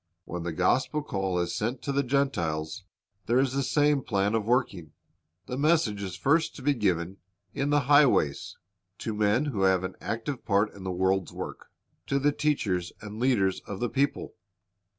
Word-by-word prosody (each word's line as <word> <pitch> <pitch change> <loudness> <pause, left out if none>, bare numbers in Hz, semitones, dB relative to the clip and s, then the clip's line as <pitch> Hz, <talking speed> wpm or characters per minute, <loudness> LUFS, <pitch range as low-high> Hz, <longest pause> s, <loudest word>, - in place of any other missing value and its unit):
When 90 - -5
the 85 0 -3
gospel 130 - +1
call 95 -8 -2
is 85 0 -1
sent 120 +4 -2
to 140 - -2
the 140 +1 +2
Gentiles, 90 - -1 0.4
there 120 - +3
is 130 -1 +2
the 140 - 0
same 145 +1 +2
plan 100 -3 0
of 110 -2 0
working. 105 - 0 0.5
The 125 +6 -4
message 145 -10 +2
is 95 -2 -5
first 160 +4 +1
to 140 - -10
be 145 +1 +3
given 95 -5 -1 0.4
"in 140 +1 -1
the 145 0 +3
highways," 135 - +3 0.2
— 90 - -56
to 110 - -4
men 105 +6 +2
who 120 -10 -2
have 95 -1 +3
an 95 - -4
active 115 +4 -4
part 105 0 +1
in 100 - -11
the 95 - -3
world's 95 0 0
work, - - -7 0.4
to 140 - +1
the 145 +2 +2
teachers 105 - -1
and 105 0 -8
leaders 115 -7 +2
of 100 - -5
the 120 - -1
people. 140 +1 -1
110 Hz, 185 wpm, -27 LUFS, 95-140 Hz, 0.5 s, there